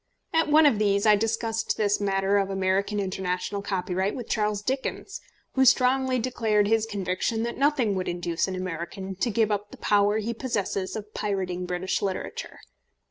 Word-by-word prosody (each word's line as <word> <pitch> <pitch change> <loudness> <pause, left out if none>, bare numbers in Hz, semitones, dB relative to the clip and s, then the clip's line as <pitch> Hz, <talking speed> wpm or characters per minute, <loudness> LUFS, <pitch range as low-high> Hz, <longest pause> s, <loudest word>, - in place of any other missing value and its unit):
At 325 -1 +2
one 310 +1 +6
of 240 -8 +4
these 200 -1 +2
I 215 -1 +7
discussed 225 +1 -1
this 205 -1 +1
matter 195 0 +2
of 195 -1 -1
American 195 +2 0
international 190 +1 -2
copyright 190 0 -1
with 245 -3 -6
Charles 210 -1 0
Dickens, 265 +4 -3 0.3
who 265 - +3
strongly 260 0 +4
declared 225 -4 +1
his 225 0 +2
conviction 205 +2 -1
that 235 +2 -4
nothing 275 -7 +2
would 185 -1 -2
induce 175 0 -1
an 190 - -3
American 185 +1 -5
to 235 - 0
give 220 0 +1
up 205 0 -2
the - - -12
power 205 0 +2
he 220 +2 -2
possesses 205 -6 -2
of 210 -1 -7
pirating 185 -3 -2
British 180 +1 -2
literature. 195 -2 -4
205 Hz, 170 wpm, -26 LUFS, 190-225 Hz, 0.3 s, I